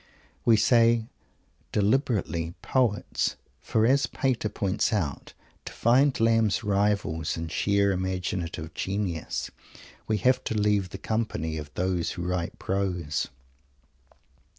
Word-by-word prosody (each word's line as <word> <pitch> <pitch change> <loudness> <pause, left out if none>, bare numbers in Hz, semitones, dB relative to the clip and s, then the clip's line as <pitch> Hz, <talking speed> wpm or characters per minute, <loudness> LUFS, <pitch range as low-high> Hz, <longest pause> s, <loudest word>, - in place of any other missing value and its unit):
We 115 -2 +6
say 115 0 +4 0.7
deliberately 100 - 0
"poets," 120 -6 0 0.2
for, 110 0 +1
as 135 +3 +3
Pater 125 -5 -1
points 100 -1 0
out, 85 -11 -2 0.3
to - - -6
find 130 +4 +3
Lamb's 115 -1 +3
rivals 100 -6 0
in 80 0 -4
sheer 100 +4 +2
imaginative 90 -3 -3
genius, 95 -5 -3 0.6
we 110 - +1
have 130 +3 +2
to 110 - -2
leave 105 -3 +2
the 95 - -7
company 100 -7 -2
of 75 -1 -8
those 90 -2 0
who 85 - -5
write 90 -1 -2
prose. 90 -6 -1
100 Hz, 115 wpm, -27 LUFS, 90-115 Hz, 0.7 s, We